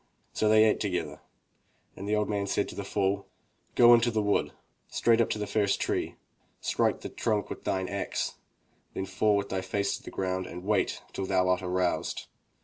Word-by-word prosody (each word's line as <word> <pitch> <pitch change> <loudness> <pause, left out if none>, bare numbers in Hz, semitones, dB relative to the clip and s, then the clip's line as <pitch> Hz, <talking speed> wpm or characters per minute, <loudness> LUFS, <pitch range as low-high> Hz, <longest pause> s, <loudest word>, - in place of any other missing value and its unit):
So 110 - +1
they 110 0 +7
ate 110 - +3
together 95 -4 -3 0.7
and 100 +2 -6
the 105 - +2
old 105 0 +1
man 100 -1 -1
said 100 - 0
to - - -8
the 100 - -4
fool: 100 0 -1 0.5
"Go 120 0 +8
into 120 0 +5
the 110 -2 0
wood, 105 0 +1 0.4
straight 115 0 +3
up 115 - +1
to - - -1
the 105 - -2
first 100 -1 +1
tree. - - -1 0.4
Strike - - 0
the - - -5
trunk 105 -3 -1
with - - -7
thine 95 -1 0
axe, 100 +1 -2 0.6
then 95 - -2
fall 100 +2 +2
with 100 0 -2
thy 95 -1 -1
face 100 +1 -1
to - - -16
the - - -8
ground 95 -1 -2
and 90 +1 -8
wait 105 +2 0
till 95 - -3
thou 95 -1 +2
art 90 0 +2
aroused. 90 -1 -1
100 Hz, 200 wpm, -29 LUFS, 95-105 Hz, 0.7 s, Go